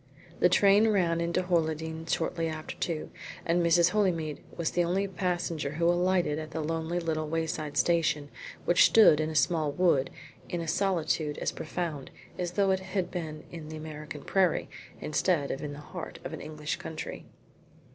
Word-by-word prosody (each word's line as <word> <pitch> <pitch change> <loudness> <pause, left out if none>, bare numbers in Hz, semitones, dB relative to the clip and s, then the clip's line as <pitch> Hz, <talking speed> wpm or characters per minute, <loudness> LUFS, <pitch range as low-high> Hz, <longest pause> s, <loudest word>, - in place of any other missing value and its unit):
The 180 - +5
train 200 +4 +5
ran 175 -6 +2
into 170 +2 0
Horleydene 160 -2 -1
shortly 165 0 0
after 155 -1 -5
two, 160 -3 -3 0.3
and 170 +1 +2
Mrs. 170 +1 +4
Holymead 170 -8 0 0.2
was 170 -2 0
the 175 - +2
only 190 +4 0
passenger 175 -5 -2
who 170 +2 0
alighted 175 -3 +2
at 155 0 -6
the 160 - -4
lonely 165 +2 -2
little 155 -2 -2
wayside 155 -2 -2
station 155 0 +2 0.4
which 175 - +6
stood 215 -9 +7
in 155 0 0
a 160 - -6
small 155 +1 +2
wood 155 -5 +2 0.4
in 175 - -2
a 165 - -4
solitude 160 -4 0
as - - -1
profound 155 -4 -4 0.3
as 175 -1 -2
though 195 0 +3
it 190 - +2
had 190 -1 -3
been 160 -4 -5
in 160 -3 -8
the 155 - -6
American 155 -2 -7
prairie, 185 -1 +1 0.3
instead 155 -2 +1
of 135 - -3
the 145 -1 -5
heart 165 +3 -8
of - - -6
an - - -6
English 150 -1 -4
county. 160 -1 -7
165 Hz, 170 wpm, -29 LUFS, 155-180 Hz, 0.4 s, stood